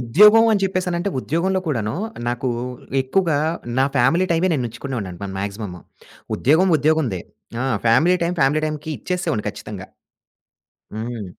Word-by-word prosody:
ఉద్యోగం 210 - +6
అని 205 - +2
చెప్పేసనంటే, 185 -1 -1
ఉద్యోగంలో 185 +7 0
కూడాను, 115 -8 -1 0.3
నాకు 120 +2 -2 0.5
ఎక్కువుగా 155 +3 +1 0.4
నా 135 - +5
ఫ్యామిలీ 135 +10 +3
టైమే 170 +3 +2
నేనుచ్చుకునేవాడినండి 115 - -4
మన 95 - -5
మాగ్జిమము. 100 -2 -5 0.6
ఉద్యోగం 165 +8 +3
ఉద్యోగందే. 145 - +1 0.4
ఆ! - - -1 0.2
ఫ్యామిలీ 160 +11 +4
టైమ్ 175 +1 -1
ఫ్యామిలీ 145 +3 +3
టైమ్‌కి 155 +1 -5
ఇచ్చేసేవోడిని 180 - -2
ఖచ్చితంగా. - - -9 1.1
హ్మ్. 115 -1 -5
145 Hz, 120 wpm, -21 LUFS, 115-180 Hz, 1.1 s, ఉద్యోగం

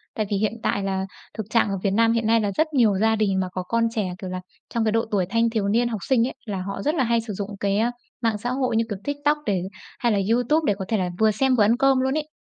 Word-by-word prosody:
Tại 215 - 0
vì 205 - 0
hiện 210 +2 0
tại 200 - 0
là 190 -1 -1 0.3
thực 220 - -3
trạng 230 -2 +2
ở 195 - -1
Việt 200 - +2
Nam 225 +3 +3
hiện 230 -1 0
nay 230 0 +4
là 205 -1 0
rất 315 - +3
nhiều 225 -8 +4
gia 220 +2 +3
đình 200 -3 +1
mà 185 - 0
có 185 0 -4
con 230 +4 +1
trẻ, 195 -5 -1
kiểu 190 -2 -6
là, 185 0 -4 0.3
trong 230 -1 +1
cái 215 - +2
độ 225 +1 +1
tuổi 195 -3 +2
thanh 230 +2 +2
thiếu 220 -3 -1
niên, 235 +4 +2
học 225 -3 -3
sinh 245 -3 +4
ấy, - - -7
là 200 -4 -3
họ 195 +2 -5
rất 300 +3 0
là 275 - +2
hay 235 -1 +2
sử 220 -2 -6
dụng 200 +1 -4
cái, 200 0 +1
ờ, 235 +2 +2 0.3
mạng 225 -2 +1
xã 240 +4 -4
hội 255 -2 0
như, 225 - +3
kiểu, 205 -3 -4
TikTok 290 +1 0
để 195 -4 0 0.4
hay 240 -3 +2
là 205 - +2
YouTube 245 +7 +2
để - - 0
có 190 - -3
thể 220 - +1
là 185 -2 -1
vừa 220 0 +4
xem 260 +5 +2
vừa 220 - +4
ăn 225 +4 +3
cơm 270 0 +4
luôn 265 +3 +1
ấy. 305 0 -3
225 Hz, 305 wpm, -24 LUFS, 200-240 Hz, 0.4 s, nay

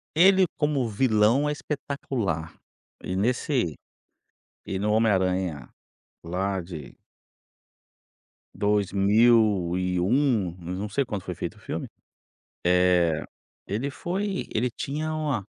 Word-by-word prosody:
ele 190 +3 +6
como 145 -5 +1
vilão 110 +5 +3
é - - 0
espetacular 130 - -3 0.5
e 90 - -3
nesse 120 - 0 0.9
e 95 - -2
no 105 +2 0
Homem 110 0 +4
Aranha 90 -7 0 0.6
lá 95 +3 -1
de 85 -7 -9 1.6
2001 100 - +2
mas 90 +2 -5
não 105 +2 -3
sei 125 +7 0
quando 105 -6 -4
foi - - -5
feito - - -5
o - - -18
filme. - - -5 0.8
Eh 90 -2 +3 0.4
ele 115 +8 -2
foi 190 +6 -3
ele 120 +3 +1
tinha 150 +6 -3
uma 145 -10 -1
105 Hz, 110 wpm, -26 LUFS, 90-135 Hz, 1.6 s, ele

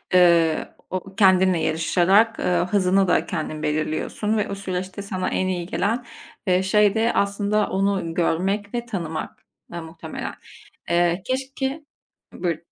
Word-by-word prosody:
ııı, 170 -3 +4 0.2
o 190 +1 -5
kendinle 185 -3 +4
yarışarak, 175 +8 +3
ııı, 180 -1 +1
hızını 195 0 +3
da - - +2
kendin 155 -2 -4
belirliyorsun 155 +8 -1
ve 210 - -1
o 200 - -3
süreçte 185 0 -4
sana 190 -2 -3
en 185 - 0
iyi 180 -2 -2
gelen, 220 +7 -1 0.4
iii, 185 +1 +3
şey 205 +2 +3
de 225 +1 +2
aslında 200 +1 +1
onu 195 -3 0
görmek 195 +5 0
ve 240 0 -2
tanımak, 170 -8 -5 0.3
ııı, 170 - -5
muhtemelen. 160 0 -7 0.6
Eee, 175 +1 +2
keşke 270 +3 -3 0.5
Buyurun. 170 -3 -3
185 Hz, 135 wpm, -23 LUFS, 170-205 Hz, 0.6 s, ııı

